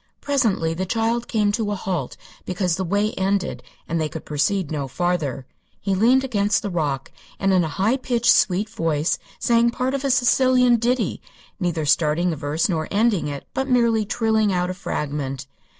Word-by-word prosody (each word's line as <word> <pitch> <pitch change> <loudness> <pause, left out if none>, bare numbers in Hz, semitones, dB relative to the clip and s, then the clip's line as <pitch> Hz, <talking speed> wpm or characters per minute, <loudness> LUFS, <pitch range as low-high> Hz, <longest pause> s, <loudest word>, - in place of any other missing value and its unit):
Presently 225 - 0
the 185 +3 -3
child 230 +3 0
came 210 -3 +1
to 215 0 -1
a 205 - -1
halt 180 -8 -4 0.3
because 180 -2 -1
the 190 - -2
way 205 +4 0
ended 195 -1 -1 0.3
and 165 -1 -1
they 155 - -1
could 160 - -8
proceed 150 +4 0
no 145 -3 -2
farther. 150 -4 -2 0.3
He 195 - -1
leaned 240 +7 +4
against 210 -5 +1
the 200 - -3
rock 150 -6 -2 0.3
and 195 -1 +1
in 180 -2 +4
a - - -1
high 200 - +1
pitched, 240 -2 +2
sweet 200 +2 +2
voice 165 -6 -1 0.2
sang 235 0 +3
part 250 +2 -2
of 275 0 -2
a 275 - 0
Sicilian 250 0 +4
ditty, 235 -2 0 0.4
neither 170 -4 -1
starting 155 +4 +2
the - - -2
verse 150 +3 -1
nor 160 -4 -1
ending 205 -5 +1
it, 140 -1 -6
but 265 +1 -2
merely 235 -3 +3
trilling 220 -1 +1
out 180 0 0
a - - -4
fragment. 140 -6 -4
195 Hz, 180 wpm, -22 LUFS, 160-230 Hz, 0.4 s, leaned